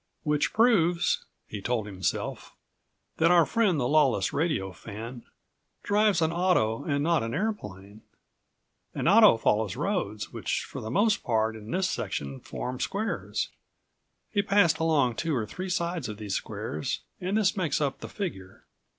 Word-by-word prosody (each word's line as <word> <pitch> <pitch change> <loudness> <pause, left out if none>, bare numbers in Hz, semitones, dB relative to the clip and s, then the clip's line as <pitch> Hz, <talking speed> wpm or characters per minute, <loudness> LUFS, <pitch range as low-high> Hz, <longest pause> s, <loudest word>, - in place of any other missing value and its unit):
"Which 150 -1 +1
proves," 180 -7 +3 0.2
he 105 - -6
told 115 0 -1
himself, 95 -4 -3 0.6
"that 165 - +4
our 175 -2 +6
friend, 210 -9 +2
the 125 - +1
lawless 135 -9 +3
radio 145 - 0
fan, 115 +6 -8 0.6
drives 205 -4 +3
an 160 - +1
auto 165 -9 +1
and 145 -2 0
not 165 0 +2
an 115 +1 -3
airplane. 105 - -4 0.9
An - - -1
auto 210 - +7
follows 105 -3 +1
roads, - - -2
which - - -2
for - - -8
the 110 - -5
most 205 - +2
part 110 -1 0
in 110 0 -10
this 185 +6 +1
section 70 - -3
form58 125 0 -5
squares. 215 +3 -2 0.8
He 205 - +2
passed 195 -5 +3
along 145 -7 +2
two 165 -3 -1
or 115 -4 -1
three 185 - -6
sides 170 -6 -1
of 105 - -6
these 105 -2 -5
squares 75 -5 -3 0.2
and 190 +4 -1
this 205 -3 +2
makes 170 -7 0
up 140 -3 -1
the - - -8
figure. 95 - -6
150 Hz, 155 wpm, -27 LUFS, 110-185 Hz, 0.9 s, auto